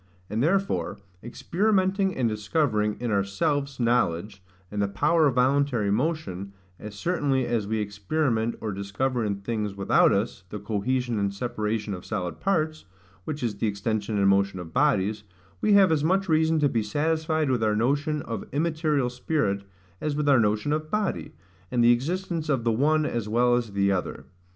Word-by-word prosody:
And 110 +2 0
therefore 170 - 0 0.3
experimenting 190 - 0
and 125 -3 +1
discovering 105 -1 0
in 120 -2 -2
ourselves 140 +8 -1
knowledge, 105 -5 0 0.3
and 105 0 -2
the 100 - +2
power 150 +9 +2
of 135 - 0
voluntary 125 -4 +2
motion, 105 - -2 0.3
as 105 -1 -8
certainly 140 - 0
as 115 -4 -1
we 110 +1 -1
experiment, 110 +3 -1
or 110 - -3
discover 110 +6 -2
in 100 -2 -2
things 105 -2 -3
without 100 -1 +4
us, 100 -1 -1
the 105 - -5
cohesion 115 +3 -1
and 100 -1 0
separation 105 -1 -3
of 90 - -7
solid 90 -5 -4
parts, 155 - -1 0.4
which 150 -3 -4
is 110 -4 -2
the 110 - 0
extension 105 +1 -2
and 100 -1 +3
motion 100 0 +2
of 80 -2 -9
bodies; 110 -7 +2 0.4
we 215 - +3
have 195 -3 +6
as 150 -2 +1
much 190 +4 +2
reason 160 -1 +3
to 145 - +4
be 115 -4 0
satisfied 155 +5 0
with 120 -3 +1
our 105 -1 +2
notion 145 +7 0
of 115 - -5
immaterial 150 -3 0
spirit, 125 -6 -1 0.4
as 150 -1 -1
with 150 0 -1
our 140 -3 +6
notion 110 +6 +1
of 155 0 -3
body, 200 - -2 0.4
and 120 -1 +1
the 120 - +7
existence 165 +5 -1
of 135 -5 +1
the 115 - +2
one 150 +6 +2
as 115 -6 -2
well 120 +2 +3
as 120 -4 -2
the 100 0 +2
other. 95 -2 -3
120 Hz, 175 wpm, -26 LUFS, 105-155 Hz, 0.4 s, the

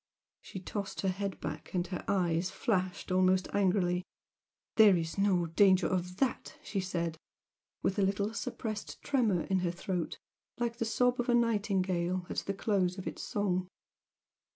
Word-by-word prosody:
She 190 - -8
tossed 200 +2 -4
her 195 - +1
head 195 +1 -3
back, 150 +4 -6
and 175 -1 +1
her 180 0 -5
eyes 175 -2 +1
flashed 185 -6 -1
almost 185 0 +3
angrily. 180 -2 +2 0.7
"There's 185 -7 +5
no 190 -4 +3
danger 185 +2 +4
of 180 0 -1
that!" 265 -2 -1
she 200 - -2
said, 170 -3 -2 0.6
with 195 - +1
a - - +4
little 200 +2 +1
suppressed 215 -2 -4
tremor 230 -11 +2
in 190 -1 +1
her 180 -1 0
throat 175 0 -3 0.4
like 235 -1 -1
the 230 - -1
sob 245 +3 +2
of 245 +1 -1
a 240 - +5
nightingale 190 -6 +1
at - - -5
the 195 - -1
close 190 -3 +1
of 190 - -6
its - - -5
song. 185 -3 -1
190 Hz, 155 wpm, -32 LUFS, 180-205 Hz, 0.7 s, There's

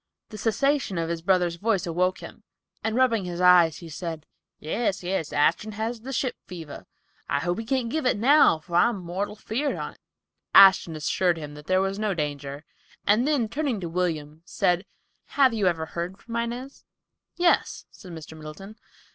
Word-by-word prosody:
The 215 - -9
cessation 235 -1 0
of 165 0 -1
his 170 -1 -3
brother's 175 -1 +1
voice 205 -1 0
awoke 180 +2 0
him, - - -11 0.4
and 220 0 -1
rubbing 235 -6 +2
his 175 -1 -5
eyes 180 -3 +6
he 170 - -10
said, 160 0 -6 0.3
"Yes, 195 +3 -2
yes, 175 -4 -2
Ashton 210 +8 +1
had 220 +3 -3
the 265 +4 -7
ship 260 0 -2
fever. 165 -5 -9 0.4
I - - +1
hope 175 +6 -1
he 225 - -5
can't 255 0 0
give 310 -3 0
it 250 - +2
now, 270 - +5
for 170 +2 -3
I'm 230 +4 +3
mortal 185 +3 -4
feared 250 +7 -2
on't." - - -7 0.6
Ashton 190 -4 +7
assured 170 +3 +1
him 150 -2 -7
there 170 +6 0
was 195 +1 -2
no 210 -3 0
danger, 145 -1 -4 0.4
and 220 +6 +3
then, 285 -7 +1
turning 275 -3 -2
to 170 - -4
William, 160 -3 -2
said, 180 +1 0 0.5
"Have 265 -4 +5
you 210 -4 +1
ever 165 -3 0
heard 170 +4 -5
from 230 +2 -9
Inez?" 240 +4 -4 0.5
"Yes," 350 0 +1
said 185 - -13
Mr. 160 -1 -9
Middleton. 160 +8 -10
185 Hz, 175 wpm, -25 LUFS, 165-225 Hz, 0.6 s, Ashton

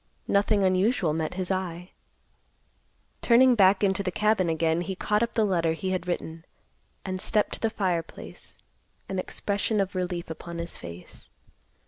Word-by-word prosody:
Nothing 200 0 +2
unusual 185 -2 +2
met 160 +2 -2
his 185 0 -2
eye. 180 -1 -3 1.3
Turning 255 +2 +6
back 195 -2 +4
into 195 0 +2
the 190 - -1
cabin 210 -2 +1
again, 160 +1 +1
he 190 +2 -4
caught 210 +3 0
up 235 - 0
the 220 - +3
letter 170 -5 +1
he 185 +3 -3
had 180 -1 -2
written, 165 -2 -4 0.6
and 185 -1 -3
stepped 210 -2 +1
to - - -6
the 225 - +1
fireplace, 180 -6 -4 0.5
an 190 - -3
expression 205 +3 -1
of 195 -1 0
relief 180 -2 -3
upon 170 +1 -7
his 170 0 -5
face. 85 +1 -11
185 Hz, 155 wpm, -27 LUFS, 170-200 Hz, 1.3 s, Turning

